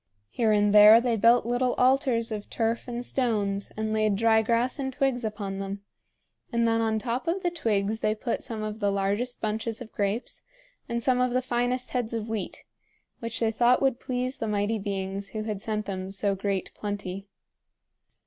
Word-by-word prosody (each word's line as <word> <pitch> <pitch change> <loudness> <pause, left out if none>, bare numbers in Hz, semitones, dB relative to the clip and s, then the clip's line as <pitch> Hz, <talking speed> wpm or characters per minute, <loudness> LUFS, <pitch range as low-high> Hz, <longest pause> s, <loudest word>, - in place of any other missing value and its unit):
Here 225 -3 +1
and 205 -1 +3
there 210 +2 +9
they 240 -1 0
built 230 +3 +4
little 245 +1 +1
altars 255 -3 +2
of 210 -1 -5
turf 230 +1 -1
and 240 0 -4
stones 205 -7 -1
and 220 0 -1
laid 215 -2 +2
dry 220 +1 +4
grass 235 +5 0
and 265 -1 -2
twigs 260 -2 0
upon 205 -3 -4
them; 195 +1 -5 0.7
and 235 -1 +2
then 225 0 +2
on 220 -1 +1
top 240 +7 -3
of 370 +3 -1
the 350 - +1
twigs 220 -8 0
they 215 0 +1
put 230 +2 -3
some 220 -2 -4
of 215 0 -4
the 205 -2 +1
largest 200 +6 -1
bunches 220 +1 -2
of 245 -3 -9
grapes 205 +4 -2 0.5
and 235 0 -2
some 250 0 +2
of 250 -1 +1
the 255 - +3
finest 245 +1 -1
heads 240 -2 -2
of 220 -1 -3
wheat, 215 -4 -4 0.5
which 230 -1 -4
they 225 -1 +1
thought 240 +2 +4
would 265 -2 +1
please 255 +1 -3
the 225 - -2
Mighty 210 +1 0
Beings 195 0 -3
who 215 -1 -3
had 210 -2 -4
sent 215 -1 -2
them 190 -1 -4
so 195 +1 0
great 195 -1 -2
plenty. 200 -2 -5
225 Hz, 190 wpm, -27 LUFS, 205-245 Hz, 0.7 s, there